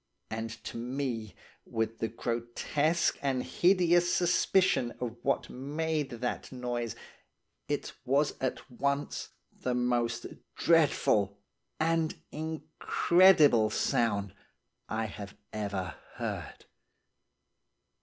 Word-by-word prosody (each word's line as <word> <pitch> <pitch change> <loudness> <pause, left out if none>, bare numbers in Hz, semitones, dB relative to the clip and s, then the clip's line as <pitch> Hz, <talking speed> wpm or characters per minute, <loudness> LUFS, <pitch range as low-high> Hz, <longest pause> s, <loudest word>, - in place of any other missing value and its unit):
And 110 +1 -3
to - - -6
me, 120 -3 -3 0.3
with 115 0 -2
the 115 - 0
grotesque 120 +8 0
and 135 -2 0
hideous 175 +4 +3
suspicion 175 -7 +3
of 120 -2 -3
what 140 - 0
made 150 +2 -2
that 120 +1 -4
noise, 120 -3 -3 0.7
it - - -2
was 140 +3 +2
at 130 - -2
once 140 +3 -1 0.3
the 125 -1 -2
most 120 -1 0 0.3
dreadful 120 - +3 0.4
and 160 0 +1 0.2
incredible 155 - +4
sound 100 -3 +1 0.6
I 110 0 -1
have 100 -1 -8 0.2
ever 100 -4 -3 0.2
heard. - - -5
125 Hz, 95 wpm, -30 LUFS, 115-155 Hz, 0.7 s, incredible